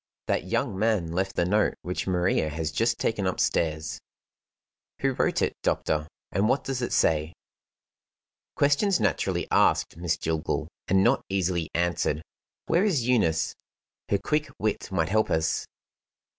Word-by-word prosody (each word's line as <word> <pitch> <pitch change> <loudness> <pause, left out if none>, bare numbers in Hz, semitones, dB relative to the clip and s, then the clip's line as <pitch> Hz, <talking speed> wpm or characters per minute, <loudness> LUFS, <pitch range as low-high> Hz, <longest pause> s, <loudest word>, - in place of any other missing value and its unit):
"That - - 0
young 95 - -1
man 105 -6 +1
left 95 +3 -1
the 85 - +2
note 105 +4 +2
which 90 +2 -3
Maria 90 -3 +1
has 80 0 -3
just 115 +6 +1
taken 105 -4 0
upstairs." 80 -4 -1 1.0
"Who - - +2
wrote - - +1
it, - - 0
doctor, 75 0 0 0.2
and 100 +4 +1
what 135 0 +2
does 135 -1 -3
it 120 - -2
say?" 80 +1 +2 1.2
"Questions 145 +8 +3
naturally 100 -6 0
asked, - - +3
Miss 85 -1 0
Jillgall 80 -1 -2 0.2
and 95 +1 +4
not - - +3
easily 90 -4 0
answered. 80 -2 0 0.4
Where 175 +3 +2
is 155 - +1
Eunice? 85 -11 +2 0.6
Her 100 - +3
quick 150 +8 -1
wit 110 -2 -2
might 80 -4 0
help 110 +2 +2
us." 80 0 0
95 Hz, 145 wpm, -27 LUFS, 80-110 Hz, 1.2 s, and